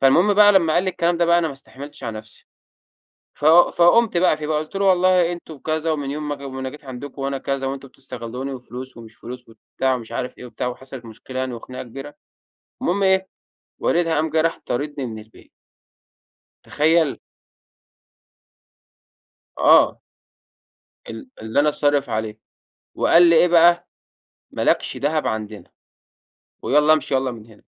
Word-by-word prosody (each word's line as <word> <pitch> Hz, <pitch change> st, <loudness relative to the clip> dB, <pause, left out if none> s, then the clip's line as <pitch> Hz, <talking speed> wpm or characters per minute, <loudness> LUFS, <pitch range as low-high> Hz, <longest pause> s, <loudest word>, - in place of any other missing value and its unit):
فالمهم 175 Hz, +10 st, +4 dB
بقى 205 Hz, 0 st, +7 dB
لمّا 170 Hz, -5 st, +3 dB
قال 180 Hz, -, +2 dB
لي 185 Hz, -, 0 dB
الكلام 170 Hz, -1 st, 0 dB
ده 170 Hz, -, +2 dB
بقى 170 Hz, +1 st, +4 dB
أنا 165 Hz, -, 0 dB
ما 145 Hz, -, -4 dB
استحملتش 135 Hz, 0 st, -11 dB
على 110 Hz, -1 st, -4 dB
نفسي، 110 Hz, 0 st, -15 dB, 0.9 s
ف 145 Hz, -, -7 dB
فقمت 175 Hz, +5 st, +5 dB
بقى 170 Hz, -3 st, +3 dB
فيه 150 Hz, -1 st, -6 dB
بقى 155 Hz, -1 st, 0 dB
قلت 155 Hz, +4 st, -8 dB
له: 195 Hz, 0 st, 0 dB
"والله 185 Hz, -2 st, +3 dB
أنتم 165 Hz, -3 st, -9 dB
كذا، 160 Hz, +2 st, -2 dB
ومن 145 Hz, -3 st, -3 dB
يوم 150 Hz, 0 st, -5 dB
ما 145 Hz, -, -2 dB
جي 140 Hz, 0 st, -11 dB
ما 130 Hz, 0 st, -7 dB
أنا 130 Hz, 0 st, -4 dB
جيت 150 Hz, +1 st, -14 dB
عندكم 135 Hz, +2 st, -8 dB
وأنا 135 Hz, 0 st, -2 dB
كذا، 135 Hz, 0 st, -3 dB
وأنتم 135 Hz, 0 st, -6 dB
بتستغلوني 130 Hz, 0 st, -7 dB
وفلوس 125 Hz, 0 st, -9 dB
ومش 115 Hz, -1 st, -13 dB
فلوس 125 Hz, 0 st, -10 dB
وبتاع 130 Hz, +3 st, -2 dB
ومش 115 Hz, -2 st, -9 dB
عارف 125 Hz, -, -5 dB
إيه 125 Hz, -, -10 dB
وبتاع" 125 Hz, -, -5 dB
وحصلت 130 Hz, 0 st, -8 dB
مشكلة 115 Hz, +4 st, -8 dB
يعني 130 Hz, -1 st, -3 dB
وخناقة 125 Hz, +3 st, -8 dB
كبيرة، 135 Hz, +4 st, -10 dB, 0.7 s
المهم 195 Hz, +3 st, 0 dB
إيه، 190 Hz, 0 st, +2 dB, 0.5 s
والدها 170 Hz, -1 st, +1 dB
قام 155 Hz, +1 st, 0 dB
جه 160 Hz, +1 st, +1 dB
راح 165 Hz, 0 st, -1 dB
طاردني 145 Hz, +1 st, -3 dB
من 110 Hz, -2 st, -7 dB
البيت. 110 Hz, +1 st, -19 dB, 1.1 s
تخيل! 160 Hz, 0 st, +1 dB, 2.4 s
آه. -, -, +5 dB, 1.1 s
ال 275 Hz, -, -9 dB
اللي 110 Hz, +5 st, 0 dB
أنا 150 Hz, +1 st, +3 dB
صارف 145 Hz, -1 st, 0 dB
عليه، 110 Hz, 0 st, -3 dB, 0.6 s
وقال 170 Hz, -, +4 dB
لي 165 Hz, -, +5 dB
إيه 175 Hz, -, +5 dB
بقى: 175 Hz, +1 st, +4 dB, 0.6 s
"ما -, -, -5 dB
لكش -, -, 0 dB
دهب 150 Hz, +2 st, -1 dB
عندنا، 110 Hz, -1 st, -5 dB, 0.9 s
ويالّا 150 Hz, +1 st, +4 dB
امشي 150 Hz, -2 st, -1 dB
ياّلا 130 Hz, -1 st, 0 dB
من 110 Hz, -2 st, -11 dB
هنا." 110 Hz, -2 st, -19 dB
145 Hz, 165 wpm, -21 LUFS, 130-170 Hz, 2.4 s, بقى